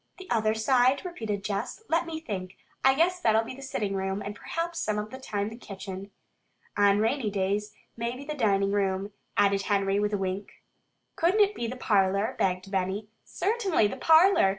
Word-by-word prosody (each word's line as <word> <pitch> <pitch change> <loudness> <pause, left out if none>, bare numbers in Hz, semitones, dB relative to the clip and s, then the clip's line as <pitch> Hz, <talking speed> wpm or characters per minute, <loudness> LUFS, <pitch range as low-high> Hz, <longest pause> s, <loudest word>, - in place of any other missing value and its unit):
"The 375 - -11
other 220 -2 +2
side?" 255 +6 +3
repeated 220 - -4
Jess. 210 - -3
"Let 330 +1 +1
me 320 -1 -4
think! 190 - -6 0.3
I 265 0 +5
guess 355 +4 +2
that'll 220 -8 +3
be 225 - -7
the 270 - -11
sitting 210 -7 -2
room, 195 +1 -2
and 205 - -4
perhaps 335 +7 -4
some 215 -1 -1
of 210 +1 -4
the 260 - -8
time 205 -5 -2
the 225 - -9
kitchen." 195 -3 -8 0.7
"On 200 -1 +4
rainy 225 +2 +1
days, 205 +1 -1 0.2
maybe 240 +4 -4
the 300 - -3
dining 200 -7 +2
room," 195 0 0 0.3
added 200 -1 +4
Henry 195 0 +1
with 210 0 0
a - - +2
wink. 190 +1 -4 0.5
"Couldn't 365 +6 +3
it 410 0 +4
be 235 - -3
the 250 - -4
parlor?" 200 +1 +2
begged 185 +1 0
Benny. 195 +2 -1
"Certainly, 385 - +1
the - - -5
parlor! 325 - +6
210 Hz, 185 wpm, -28 LUFS, 195-265 Hz, 0.7 s, parlor